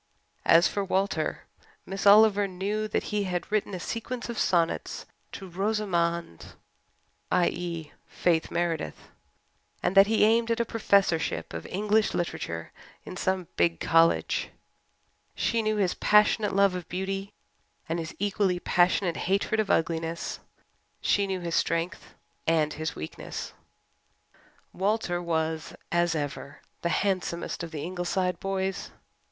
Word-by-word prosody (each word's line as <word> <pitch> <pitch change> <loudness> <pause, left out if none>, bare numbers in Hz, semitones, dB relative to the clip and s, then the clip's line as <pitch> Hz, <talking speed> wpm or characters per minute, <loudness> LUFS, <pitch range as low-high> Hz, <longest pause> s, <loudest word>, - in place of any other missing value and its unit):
As 165 +2 +7
for 200 - -2
Walter, 195 +1 -1 0.4
Miss 195 +1 -2
Oliver 205 -1 +7
knew 200 +3 -2
that 210 - -1
he 205 -1 +1
had 180 0 -3
written 210 -2 0
a - - -5
sequence 240 +6 -4
of 235 - -3
sonnets 170 -2 0 0.3
"to 195 - -8
Rosamond" 175 - -1 0.8
i.e., 170 -3 0 0.2
Faith 165 -2 +1
Meredith 170 -2 -2 0.7
and - - +1
that 195 0 +8
he 220 0 +3
aimed 230 +1 +3
at 230 0 +1
a 235 - +2
Professorship 200 -7 +1
of - - -6
English 210 +2 +1
literature 85 - -3 0.3
in - - -7
some 185 -1 -1
big 85 -1 +2
college. 165 0 +3 0.9
She 230 -1 +1
knew 215 0 0
his 195 -4 +1
passionate 210 -1 +3
love 200 -1 +4
of 180 -2 -6
beauty 195 +2 -3 0.6
and 165 0 -1
his 160 -1 -6
equally 195 -2 0
passionate 175 0 +2
hatred 200 +3 +1
of 215 -2 0
ugliness; 165 0 -1 0.6
she 200 -1 +2
knew 190 -1 -2
his 170 -1 -4
strength 165 +2 -1 0.3
and 155 -2 +2
his 155 +1 -4
weakness. 80 - -6 1.2
Walter 190 -2 0
was, 160 -2 -2 0.2
as 175 -1 +2
ever, 145 -1 -5 0.2
the 170 - 0
handsomest 180 0 -1
of 170 - -5
the 155 -3 -5
Ingleside 180 +1 -1
boys. 195 0 -2
185 Hz, 130 wpm, -27 LUFS, 170-205 Hz, 1.2 s, that